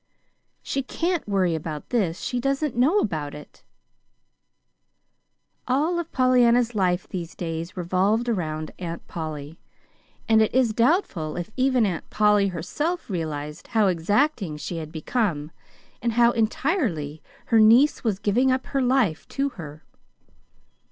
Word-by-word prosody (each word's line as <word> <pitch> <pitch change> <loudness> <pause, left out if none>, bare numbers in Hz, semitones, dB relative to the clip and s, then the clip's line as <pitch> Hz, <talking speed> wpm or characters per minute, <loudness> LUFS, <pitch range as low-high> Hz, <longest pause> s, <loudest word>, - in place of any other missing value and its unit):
"She 275 - -2
CAN'T 335 +4 -2
worry 185 -4 +2
about 155 -1 -5
this 190 -9 0
she 250 - -2
doesn't 275 +1 -1
know 275 - +3
about 155 - -1
it!" 150 - -13 2.1
All 305 +7 +1
of 335 -1 -5
Pollyanna's 245 -2 +3
life 185 -3 0
these 175 -2 -6
days 165 +1 -5
revolved 190 +6 +1
around 155 -8 -2
Aunt 170 -2 -6
Polly, 155 -1 -6 0.7
and 220 -1 +5
it 220 - +2
is 250 -4 +3
doubtful 230 - +1
if 175 +4 -5
even 255 -3 +3
Aunt 180 -5 -3
Polly 210 -1 +3
herself 220 - -3
realized 155 -2 -4
how 220 -3 +2
exacting 195 - +1
she 160 +3 -5
had 155 -1 -6
become, 160 -2 -2 0.5
and 235 0 0
how 235 +1 +5
entirely 220 - -1 0.2
her 225 - +3
niece 235 +7 +5
was 215 -5 0
giving 220 +6 +2
up 260 0 0
her 275 - -1
life 250 - +1
to 280 +1 -1
her. 155 - -10
210 Hz, 135 wpm, -24 LUFS, 165-255 Hz, 2.1 s, and